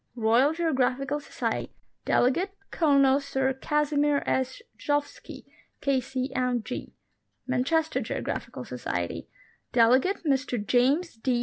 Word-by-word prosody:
Royal 235 +5 +3
Geographical 280 -3 0
Society; 290 - -4 0.3
delegate, 355 +11 +2 0.2
Colonel 275 -4 +4
Sir 265 -1 -1
Casimir 295 +1 +1
S. 260 0 -1 0.2
Gzowski,K.C.M.G. 260 -3 -3 0.5
Manchester 310 +6 0
Geographical - - -4
Society; - - -4 0.4
delegate, 255 - +3
Mr 270 -3 +1
James 275 - +2
D. 245 +1 0
270 Hz, 85 wpm, -27 LUFS, 255-295 Hz, 0.5 s, Colonel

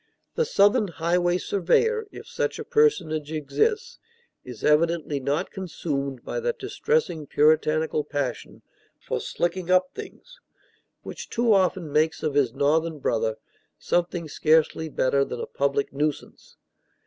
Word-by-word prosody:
The 475 - +1
Southern 205 - +3
highway 175 +1 +1
surveyor, 415 - +1
if - - -10
such - - -2
a - - -5
personage 160 - +1
exists, 430 - -1 0.4
is 125 -4 -10
evidently 155 -1 +2
not 140 +3 -2
consumed 140 - -4
by - - -3
that 480 0 -2
distressing 445 - -1
puritanical 155 +1 +2
passion 140 -4 -4 0.4
for - - -3
"slicking 175 +1 -2
up 185 0 +3
things" - - -11 0.6
which - - -8
too 235 -1 +2
often 185 -4 +1
makes 155 +2 +1
of 155 -2 0
his 140 -4 +2
Northern 155 +4 +1
brother 110 -5 -1 0.4
something 175 -1 -1
scarcely 160 +1 +2
better 140 -1 +1
than 125 -3 -5
a - - -3
public 140 0 -1
nuisance. 150 +1 -4
160 Hz, 130 wpm, -25 LUFS, 145-185 Hz, 0.6 s, Southern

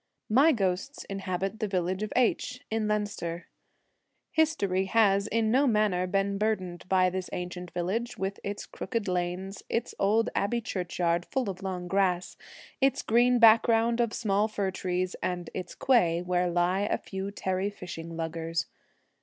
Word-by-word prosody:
My 275 +8 +6
ghosts 195 +2 -1
inhabit 195 +1 -3
the 215 - 0
village 185 0 -1
of 215 - -3
H, 250 0 +1
in 220 -1 0
Leinster. 205 -5 -2 0.9
History 200 - +1
has 200 -1 +3
in 220 0 +1
no 275 +4 +4
manner 210 -5 +2
been 195 +1 0
burdened 185 -5 -2
by 185 -1 +4
this 185 0 -4
ancient 180 0 -5
village, 195 +9 -2
with 195 0 -3
its 200 +1 -4
crooked 230 -5 -4
lanes, 180 +2 -2
its 230 - -1
old 220 +3 +2
abbey 225 +4 0
churchyard 175 -4 -1
full 255 -7 -1
of 185 0 -11
long 185 -2 -4
grass, 185 -1 +1 0.5
its 270 0 +2
green 245 +2 +4
background 230 +1 +5
of 235 -2 +1
small 210 -2 +1
fir 200 -3 -2
trees, 185 0 -2
and 175 -2 -3
its 185 - -6
quay, 175 -10 +3
where 180 0 +1
lie 175 +2 +1
a 205 - 0
few 190 0 -5
tarry 190 0 -1
fishing 170 -4 -8
luggers. 165 0 -2
195 Hz, 155 wpm, -28 LUFS, 180-220 Hz, 0.9 s, My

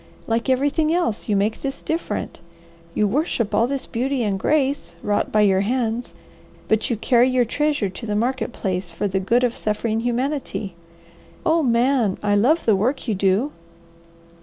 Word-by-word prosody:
"Like 230 +3 -1
everything 285 +4 +2
else 325 -12 -1
you 210 - +2
make 205 +3 0
this 275 0 -4
different. 325 +2 -3 0.6
You 210 - +2
worship 235 - -1
all 230 - +3
this 275 0 -3
beauty 255 +2 -1
and 200 -3 -1
grace, 285 +3 0
wrought 205 0 0
by 215 - +3
your 195 -2 +4
hands, 235 +1 -1 0.5
but 220 0 +1
you 235 - 0
carry 245 +3 +3
your 255 -1 +2
treasure 295 -2 0
to 195 +5 -8
the 210 - -1
market 245 +2 -1
place 185 -5 -3
for 165 +5 -2
the 190 0 -1
good 230 +6 +2
of 240 -1 +1
suffering 215 +1 -1
humanity. 245 -4 -2 0.7
Oh 330 0 +3
Man! 240 -4 +2
I 205 -1 +2
love 260 +11 +3
the 220 - +4
work 250 +8 -1
you 220 - +1
do!" 195 +8 +1
235 Hz, 170 wpm, -22 LUFS, 210-270 Hz, 0.7 s, your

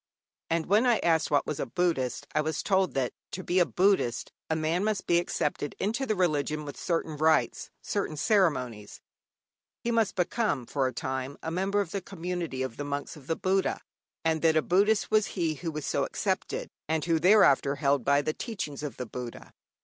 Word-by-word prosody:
And 165 -1 +1
when 215 +6 +3
I 240 -2 +5
asked 165 -2 +2
what 145 - +2
was 150 - -3
a - - -2
Buddhist, 140 -4 0
I 150 - +3
was 155 +1 -2
told 190 -2 +2
that, 130 -2 0 0.2
to 185 - -4
be 180 +2 +2
a 175 - +4
Buddhist, 185 -11 +1 0.2
a 160 - +1
man 160 +4 0
must 215 -2 -1
be 170 0 +4
accepted 150 -4 -2
into 230 +7 -1
the 215 - +1
religion 155 -4 0
with 145 - -7
certain 165 -2 -2
rites, 155 +1 +2
certain 195 -7 -2
ceremonies, 130 - +1 0.8
he 235 - 0
must 225 -3 +1
become 185 - 0
for 135 +1 0
a - - -2
time 130 +3 -4
a 160 - -3
member 195 +4 +1
of 180 -4 -5
the 200 - -2
community 175 -7 -4
of 130 -3 -5
the 145 - -3
monks 145 +2 -4
of 145 -3 -14
the 165 - 0
Buddha, 190 +2 0 0.5
and 160 -1 +2
that 160 -1 +4
a 155 - +3
Buddhist 205 +4 +2
was 215 -1 +4
he 165 -3 +1
who 165 +3 -5
was 150 -2 -5
so - - 0
accepted, - - -2 0.2
and 160 -1 0
who 165 -1 +2
thereafter 155 -7 +5
held 140 -2 +1
by 140 +3 +3
the 155 - -1
teachings 190 - -5
of 150 -3 -5
the 125 - -4
Buddha. 120 - -8
160 Hz, 200 wpm, -28 LUFS, 145-190 Hz, 0.8 s, I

